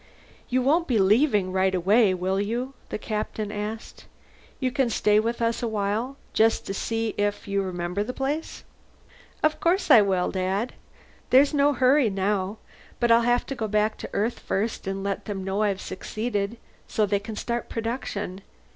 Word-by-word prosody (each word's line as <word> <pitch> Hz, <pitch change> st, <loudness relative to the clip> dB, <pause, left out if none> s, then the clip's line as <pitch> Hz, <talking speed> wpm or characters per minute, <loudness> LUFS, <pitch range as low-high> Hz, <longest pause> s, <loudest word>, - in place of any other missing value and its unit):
"You 255 Hz, 0 st, +1 dB
won't 325 Hz, +6 st, +2 dB
be 245 Hz, -, +2 dB
leaving 205 Hz, -1 st, +3 dB
right 190 Hz, 0 st, +2 dB
away, 200 Hz, +4 st, +4 dB
will 185 Hz, +2 st, -1 dB
you?" 240 Hz, +6 st, -2 dB, 0.2 s
the -, -, -3 dB
Captain 215 Hz, 0 st, -3 dB
asked. 210 Hz, +2 st, -6 dB, 0.5 s
"You 255 Hz, -2 st, 0 dB
can 265 Hz, -2 st, +1 dB
stay 210 Hz, -2 st, +3 dB
with 230 Hz, +2 st, -1 dB
us 230 Hz, 0 st, 0 dB
a 240 Hz, -, -1 dB
while, 220 Hz, +5 st, -2 dB, 0.2 s
just 225 Hz, +1 st, +3 dB
to 195 Hz, -, -3 dB
see 225 Hz, +2 st, -2 dB
if 205 Hz, 0 st, -1 dB
you 200 Hz, 0 st, 0 dB
remember 180 Hz, +1 st, -2 dB
the 250 Hz, -, -4 dB
place?" 280 Hz, +5 st, -3 dB, 0.8 s
"Of 310 Hz, 0 st, +2 dB
course 345 Hz, -1 st, +2 dB
I 235 Hz, -5 st, +9 dB
will, 190 Hz, -3 st, +1 dB
Dad. 190 Hz, +5 st, -1 dB, 0.6 s
There's 275 Hz, +4 st, +5 dB
no 290 Hz, 0 st, +4 dB
hurry 260 Hz, -1 st, +4 dB
now. 195 Hz, +1 st, -1 dB, 0.4 s
But 240 Hz, -1 st, +2 dB
I'll 230 Hz, 0 st, +6 dB
have 240 Hz, +1 st, +2 dB
to -, -, -4 dB
go 225 Hz, -3 st, -2 dB
back 215 Hz, +1 st, +1 dB
to -, -, -6 dB
Earth 225 Hz, +4 st, -1 dB
first 210 Hz, +1 st, -2 dB
and 195 Hz, 0 st, -3 dB
let 200 Hz, 0 st, -3 dB
them 195 Hz, -2 st, -4 dB
know 195 Hz, +2 st, -1 dB
I've 200 Hz, -3 st, +1 dB
succeeded, 215 Hz, +2 st, -3 dB, 0.3 s
so 215 Hz, -, +1 dB
they 200 Hz, 0 st, +1 dB
can 215 Hz, +2 st, -7 dB
start 235 Hz, +2 st, -3 dB
production. 220 Hz, -5 st, -4 dB
215 Hz, 175 wpm, -25 LUFS, 200-245 Hz, 0.8 s, I